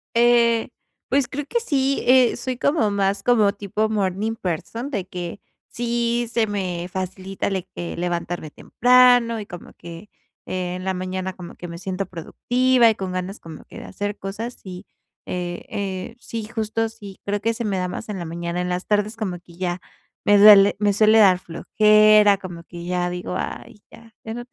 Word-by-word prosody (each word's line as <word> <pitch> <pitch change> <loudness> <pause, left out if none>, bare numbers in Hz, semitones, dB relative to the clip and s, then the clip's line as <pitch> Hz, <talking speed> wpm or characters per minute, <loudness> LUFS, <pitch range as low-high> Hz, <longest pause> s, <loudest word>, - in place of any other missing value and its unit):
Eh, 235 -1 +4 0.4
pues 275 -2 +1
creo 290 +1 -4
que 475 - -1
sí, 275 - 0
eh, 255 -1 +5
soy 255 -2 -4
como 280 -8 +1
más 200 0 0
como 215 -5 +3
tipo 205 +2 -2
morning 210 +1 -1
person, 225 - -4
de 200 -8 -3
que 175 +1 -6 0.3
sí, 235 0 -1
se 225 -2 +2
me 180 -4 -3
facilita 190 +1 -4
de 190 -2 -2
que 175 - -5
levantarme 175 -2 -3
temprano, 245 +2 +4
y 205 - -8
como 175 - -10
que 170 +4 -11 0.4
en 185 0 -4
la 190 - -1
mañana 185 0 -4
como 175 -2 -10
que 175 - -9
me 170 0 -8
siento 190 +1 -4
productiva 245 +7 +2
y - - 0
con 190 -1 -4
ganas 185 +2 -4
de - - -20
como 160 -2 -11 0.2
hacer 205 +1 -4
cosas, 220 +5 -6
y, 185 +1 -8 0.4
eh 175 -1 -4
eh, 195 +3 -5
sí, 230 -2 -6
justo 225 0 -2
sí 200 -3 -12
creo 205 0 -2
que 230 +1 0
se 235 - -4
me 195 -3 -1
da 180 - -1
más 215 +4 -6
en 200 -3 -4
la 170 - -5
mañana. 170 +1 -4
En 180 - -2
las 180 +1 -3
tardes 210 +1 0
como 195 -6 -3
que 170 -1 -19
ya 180 -1 -3 0.4
me 205 0 +5
duele 205 -1 +8
me 205 -1 +3
suele 215 +2 +5
dar 190 -4 +6
flojera, 210 +3 +4
como 175 -3 -9
que 170 0 -10
ya 180 0 -1
digo: 180 0 -5
"Ay, 205 - -6
ya, 230 -1 -16
ya 220 0 -5
no 240 - -6
200 Hz, 185 wpm, -22 LUFS, 180-225 Hz, 0.4 s, duele